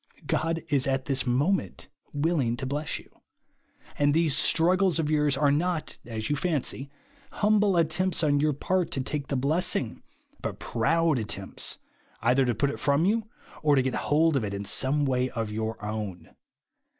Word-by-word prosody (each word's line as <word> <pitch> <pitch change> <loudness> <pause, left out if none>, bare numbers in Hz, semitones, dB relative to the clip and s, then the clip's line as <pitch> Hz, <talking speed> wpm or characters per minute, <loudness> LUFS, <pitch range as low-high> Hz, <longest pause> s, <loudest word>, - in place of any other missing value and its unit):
God 165 0 -1
is 140 -3 +1
at 135 -1 0
tlils 135 -2 0
moment 145 +11 0 0.2
willing 145 -6 0
to 130 - -4
bless 145 +3 -2
you; - - -13 0.9
and 145 0 +3
these 160 -4 +2
struggles 180 +3 +3
of 155 -2 0
yours 150 -2 +2
are 145 -1 +3
not, 165 +2 -1
as 110 -2 -4
you 145 - +1
fancy, 145 -3 -2 0.4
humble 210 -3 +3
at 165 -2 +2
tempts 185 -1 0
on 145 -2 +3
your 150 +1 +2
part 180 +5 0
to 135 - -1
take 140 +1 -4
the 140 - -2
blessing, 140 -2 0 0.4
but - - -4
proud 160 +5 +1
attempts 110 - -3 0.4
either 125 +3 +3
to 120 -2 0
put 140 +6 +1
it - - -7
from 145 +3 +2
you, 220 +2 +1 0.3
or 150 -2 +4
to 135 - +3
get 130 -1 -1
hold 155 +1 +2
of 135 - +1
it 100 -1 -3
in 100 0 -5
some 145 +7 +1
way 130 -1 +1
of 115 -3 -4
your 110 +1 -3
own. 105 -6 -5
145 Hz, 175 wpm, -27 LUFS, 130-165 Hz, 0.9 s, or